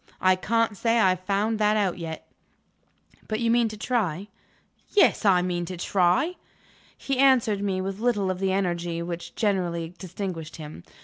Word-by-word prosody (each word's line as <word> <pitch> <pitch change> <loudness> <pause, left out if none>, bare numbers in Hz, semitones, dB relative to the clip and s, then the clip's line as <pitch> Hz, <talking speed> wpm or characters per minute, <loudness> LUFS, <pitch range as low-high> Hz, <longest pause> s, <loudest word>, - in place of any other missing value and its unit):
I 185 0 +4
can't 225 +3 0
say 230 +3 +1
I 190 - +5
have 185 -1 0
found 205 +4 -1
that 210 0 +3
out 190 -4 0
yet." 160 -1 -6 1.0
"But 215 0 -2
you 230 -1 +1
mean 235 -1 +3
to 215 -1 -7
try?" 205 -5 -1 0.6
"Yes; 405 - +3
I 185 -3 +5
mean 175 -1 -1
to 180 +1 -6
try." 185 - +1 0.6
He 270 -2 -2
answered 245 -7 +4
me 190 -2 -1
with 195 +1 -4
little 210 -5 +1
of 185 - -5
the 190 0 0
energy 175 -3 -1
which 170 0 -6
generally 175 -5 -1
distinguished 180 -4 -6
him. 150 - -9
195 Hz, 170 wpm, -25 LUFS, 175-220 Hz, 1.0 s, I